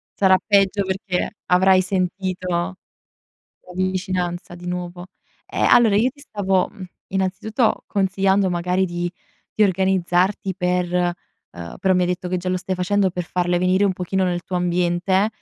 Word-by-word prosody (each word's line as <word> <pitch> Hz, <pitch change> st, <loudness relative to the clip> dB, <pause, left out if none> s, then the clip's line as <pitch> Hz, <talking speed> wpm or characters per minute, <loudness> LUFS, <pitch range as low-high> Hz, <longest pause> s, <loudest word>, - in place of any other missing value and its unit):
Sarà 190 Hz, -1 st, +5 dB
peggio, 200 Hz, -1 st, +3 dB
perché 190 Hz, -1 st, -2 dB
avrai 185 Hz, +1 st, +5 dB
sentito 185 Hz, 0 st, -2 dB
la 175 Hz, +2 st, -1 dB, 1.0 s
vicinanza 185 Hz, -1 st, -2 dB
di 175 Hz, 0 st, -11 dB
nuovo; 180 Hz, 0 st, -5 dB, 0.4 s
ehm, -, -, 0 dB
allora 235 Hz, -4 st, +6 dB
io 235 Hz, +5 st, +3 dB
ti 285 Hz, +2 st, -20 dB
stavo, 195 Hz, -8 st, 0 dB
mhmm, 190 Hz, -, -10 dB, 0.2 s
innanzitutto, 195 Hz, +5 st, 0 dB
consigliando 195 Hz, 0 st, +1 dB
magari 180 Hz, +2 st, 0 dB
di 175 Hz, -1 st, -3 dB, 0.5 s
di -, -, +5 dB
organizzarti 190 Hz, 0 st, +1 dB
per 180 Hz, 0 st, 0 dB
uhm, 175 Hz, -, -4 dB
però 190 Hz, 0 st, +3 dB
mi 180 Hz, -, +2 dB
hai -, -, +2 dB
detto 180 Hz, 0 st, -3 dB
che 185 Hz, -, -1 dB
già 180 Hz, +1 st, -4 dB
lo 185 Hz, -, +1 dB
stai 185 Hz, +1 st, -3 dB
facendo, 190 Hz, +1 st, +1 dB
per 180 Hz, 0 st, -3 dB
farle 175 Hz, 0 st, 0 dB
venire 185 Hz, +2 st, +2 dB
un 195 Hz, -, +2 dB
pochino 185 Hz, +1 st, -1 dB
nel 175 Hz, -1 st, -1 dB
tuo 180 Hz, -, -4 dB
ambiente, 180 Hz, +3 st, +1 dB
185 Hz, 155 wpm, -21 LUFS, 180-195 Hz, 1.0 s, allora